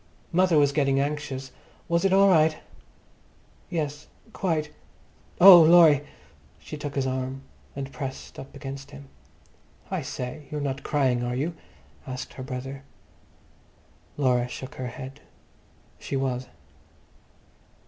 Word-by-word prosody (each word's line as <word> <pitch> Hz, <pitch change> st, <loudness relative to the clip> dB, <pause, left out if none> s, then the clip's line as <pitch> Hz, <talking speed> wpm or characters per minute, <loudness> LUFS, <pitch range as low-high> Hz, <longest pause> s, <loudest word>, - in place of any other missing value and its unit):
"Mother 180 Hz, -1 st, +3 dB
was 145 Hz, -1 st, +4 dB
getting 140 Hz, -2 st, +2 dB
anxious. 140 Hz, -2 st, -3 dB, 0.4 s
Was 170 Hz, 0 st, +1 dB
it 195 Hz, -, +3 dB
all 195 Hz, +1 st, +6 dB
right?" 160 Hz, -4 st, +4 dB, 1.1 s
"Yes, 150 Hz, -4 st, -3 dB, 0.3 s
quite. 155 Hz, -5 st, -1 dB, 0.7 s
Oh, 180 Hz, -1 st, +11 dB
Laurie!" 160 Hz, -3 st, +7 dB, 0.5 s
She -, -, -9 dB
took 145 Hz, -1 st, -6 dB
his 135 Hz, -1 st, 0 dB
arm, 130 Hz, +1 st, -3 dB, 0.3 s
she 140 Hz, -, -4 dB
pressed 135 Hz, 0 st, -7 dB
up 135 Hz, -, -10 dB
against 135 Hz, 0 st, -8 dB
him. 70 Hz, 0 st, -12 dB, 0.8 s
"I -, -, -1 dB
say, 130 Hz, +4 st, -6 dB
you're 150 Hz, -, -4 dB
not 140 Hz, -1 st, -3 dB
crying, 130 Hz, -5 st, +1 dB
are 120 Hz, 0 st, -2 dB
you?" 150 Hz, +7 st, -2 dB, 0.5 s
asked 130 Hz, 0 st, -6 dB
her -, -, -9 dB
brother. 135 Hz, +1 st, -6 dB, 1.4 s
Laura 125 Hz, -3 st, +2 dB
shook 130 Hz, +1 st, -8 dB
her 130 Hz, -, -5 dB
head. 130 Hz, +2 st, -9 dB, 0.8 s
She -, -, -5 dB
was. 130 Hz, -2 st, -2 dB
140 Hz, 125 wpm, -26 LUFS, 130-155 Hz, 1.4 s, Oh